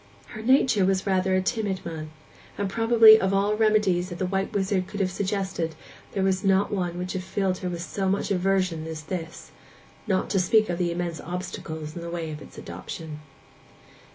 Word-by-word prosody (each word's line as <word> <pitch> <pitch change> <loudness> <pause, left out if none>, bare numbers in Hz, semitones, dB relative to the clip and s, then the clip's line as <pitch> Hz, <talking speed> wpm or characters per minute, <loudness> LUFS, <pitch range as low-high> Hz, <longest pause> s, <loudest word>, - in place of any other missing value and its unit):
Her 215 - -8
nature 250 -3 +4
was 190 0 +1
rather 190 -1 +2
a 185 - +1
timid 195 -2 -2
one; 160 -2 -5 0.5
and 200 - -1
probably 225 +1 +7
of 190 +1 +1
all 200 +2 +2
remedies 210 -5 +2
that 175 - -6
the 185 - -1
white 195 +1 -1
wizard 190 -2 0
could 205 - -7
have 185 -2 +1
suggested 190 -4 -2 0.4
there 195 - 0
was 190 0 +1
not 195 0 +3
one 180 -4 -1
which 180 +1 -4
would 190 - -2
have - - -11
filled 190 -1 -1
her 180 - -3
with 170 -1 -4
so 190 +1 -2
much 200 +1 0
aversion 185 -4 +1
as 160 -1 -6
this, 165 0 -6 0.6
not 190 -2 +1
to 195 - +2
speak 215 +2 +3
of 175 - -3
the 175 -1 +1
immense 170 -2 -3
obstacles 160 -3 -6
in 170 - -6
the 170 - -6
way 170 -2 -4
of 150 0 -7
its - - -13
adoption. 155 -2 -7
190 Hz, 200 wpm, -26 LUFS, 175-200 Hz, 0.6 s, probably